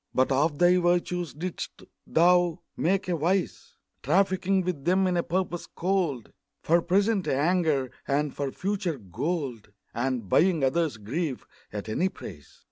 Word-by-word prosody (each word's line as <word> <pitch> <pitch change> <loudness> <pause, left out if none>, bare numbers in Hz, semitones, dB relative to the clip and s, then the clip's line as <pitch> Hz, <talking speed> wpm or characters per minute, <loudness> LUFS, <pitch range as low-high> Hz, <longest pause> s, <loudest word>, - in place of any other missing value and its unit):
But 130 +1 +3
of 145 +3 +2
thy 175 +2 +5
virtues 175 -2 0
didst 170 +5 -6 0.2
thou 175 0 +3
make 190 +4 0
a 180 - +1
vice, 180 +5 -1 0.3
Trafficking 190 0 +2
with 175 -6 -3
them 185 +4 +3
in 180 -1 +1
a 170 - +2
purpose 175 0 -2
cold, 175 - -1 0.3
For 170 +2 +3
present 195 +3 +1
anger, 150 -3 +1 0.2
and 145 0 0
for 140 -1 -2
future 190 -4 -2
gold 120 - -4 0.2
And 120 -3 -2
buying 165 - +3
others' 155 0 +1
grief 130 +6 -3 0.3
at 105 0 -5
any 175 +13 0
price. 75 - -11
170 Hz, 140 wpm, -27 LUFS, 135-180 Hz, 0.3 s, thy